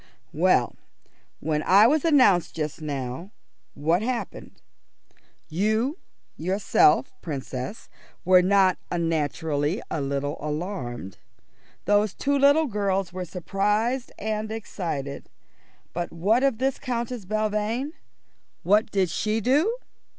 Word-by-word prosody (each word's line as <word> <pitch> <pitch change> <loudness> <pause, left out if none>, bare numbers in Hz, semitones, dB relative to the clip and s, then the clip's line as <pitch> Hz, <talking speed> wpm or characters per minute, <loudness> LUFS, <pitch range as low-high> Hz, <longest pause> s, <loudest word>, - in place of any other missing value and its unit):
"Well, - - +2 0.7
when 150 0 0
I 200 +6 +6
was 295 +5 +3
announced 255 - +4
just 155 0 -4
now, 140 +3 -4 0.5
what 165 +6 +1
happened? 240 +1 -4 0.9
You, 220 - 0 0.4
yourself, 165 -6 +3
Princess, 135 - -5 0.4
were 185 0 +6
not 190 0 +3
unnaturally 160 - -1
a 155 - -1
little 140 +1 -2
alarmed; 150 - -5 0.7
those 205 0 +2
two 285 +1 0
little 285 +3 +5
girls 195 - -1
were 185 0 -4
surprised 210 +8 -1
and 215 0 -3
excited; 165 -10 -5 0.6
but 175 0 -3
what 200 +9 +2
of 270 -4 +2
this 265 +2 -1
Countess 240 -3 -3
Belvane? 215 - -1 0.7
What 210 +5 +3
did 195 -3 +1
she 215 +5 0
do?" 285 - +2
195 Hz, 105 wpm, -25 LUFS, 160-225 Hz, 0.9 s, I